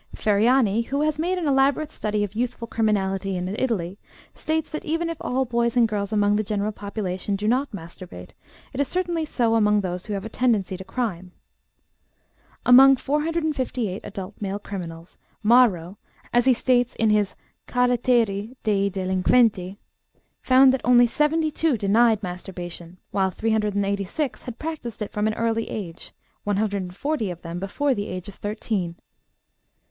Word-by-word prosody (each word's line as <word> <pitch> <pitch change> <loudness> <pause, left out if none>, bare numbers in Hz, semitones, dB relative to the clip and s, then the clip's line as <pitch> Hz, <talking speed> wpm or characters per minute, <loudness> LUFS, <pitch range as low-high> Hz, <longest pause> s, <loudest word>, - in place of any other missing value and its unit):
Ferriani, 220 +1 +3
who 275 +5 -2
has 305 0 0
made 360 +3 0
an 340 -4 -1
elaborate 280 +2 +2
study 210 -5 -1
of 205 -1 -4
youthful 235 +1 -3
criminality 195 -4 0
in 180 0 -3
Italy, 205 -4 -2 0.3
states 315 0 -2
that 310 - -4
even 330 +2 -1
if 330 - -6
all 260 +1 0
boys 235 0 0
and 235 -2 +5
girls 205 -1 -3
among 205 -1 +3
the 215 - 0
general 210 0 -1
population 200 -2 -3
do 205 +2 -2
not 260 +5 +1
masturbate, 170 - -10 0.4
it 265 - -5
is 285 - +2
certainly 345 -2 -1
so 235 -6 +1
among 210 -2 +3
those 180 0 -4
who 210 - -3
have 200 0 -4
a - - -3
tendency 220 -5 0
to 190 - -8
crime. 185 -6 -4 1.3
Among 270 +2 +8
458 285 - -1
adult 195 0 -7
male 200 0 -2
criminals, 170 -5 -8 0.2
Marro 210 -6 +4 0.4
(as 240 0 +4
he 260 - +6
states 245 0 +1
in 220 -1 +2
his 210 -2 +1 0.3
Caratteri 240 -3 +1
dei 200 -2 +2
Delinquenti) 190 +1 +1 0.6
found 260 0 +6
that 265 - -1
only 245 0 +6
72 305 +2 +1
denied 220 +2 +3
masturbation, 180 -1 -7
while 190 -1 +1
386 205 +4 -1
had 245 -2 -7
practiced 285 -9 -5
it 205 - -7
from 210 +1 0
an 215 - -1
early 230 0 -1
age, 175 -6 -7 0.3
140 205 +5 -1
of 175 -1 -7
them 170 +1 -5
before 270 +9 0
the 205 -4 -3
age 185 +1 -6
of 200 - -8
thirteen. 205 -4 -3
215 Hz, 155 wpm, -24 LUFS, 195-255 Hz, 1.3 s, Among